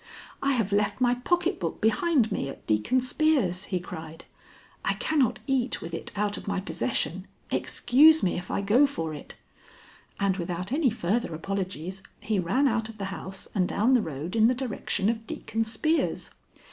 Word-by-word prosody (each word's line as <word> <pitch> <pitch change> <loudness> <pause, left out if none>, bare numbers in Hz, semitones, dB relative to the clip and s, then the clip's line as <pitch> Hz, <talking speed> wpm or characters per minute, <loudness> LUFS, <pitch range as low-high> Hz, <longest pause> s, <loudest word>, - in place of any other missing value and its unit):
'I 275 0 +2
have 225 -5 0
left 205 +3 +1
my 245 -1 +4
pocket 350 +8 0
book - - -3
behind 235 +2 +2
me 135 - -2
at - - -10
Deacon 110 - +2
Spear's,' 255 - +1
he 185 - -1
cried. 165 -2 -9 0.6
'I - - +1
cannot 285 -7 +1
eat 270 -2 0
with 165 - -8
it 165 - -5
out 205 0 0
of - - -9
my 200 -1 0
possession. 185 +1 -2 0.2
Excuse 305 +6 +5
me 180 - +1
if 180 +1 -5
I - - -1
go 230 +9 +5
for 165 - -4
it.' 150 - -9 0.8
And 195 -1 +1
without 180 +2 -4
any 285 -1 +3
further 220 -3 -1
apologies, 190 +1 -4 0.2
he 210 -1 -1
ran 245 +11 +2
out 225 -3 0
of 220 - -10
the 200 - -4
house 190 0 -6
and 185 -4 +2
down 230 +6 +2
the 250 - +5
road 160 +1 -5
in 220 0 +5
the 250 - +2
direction 235 -5 -2
of 225 0 -1
Deacon 225 +1 -2
Spear's. 310 +9 0
210 Hz, 180 wpm, -27 LUFS, 185-255 Hz, 0.8 s, Excuse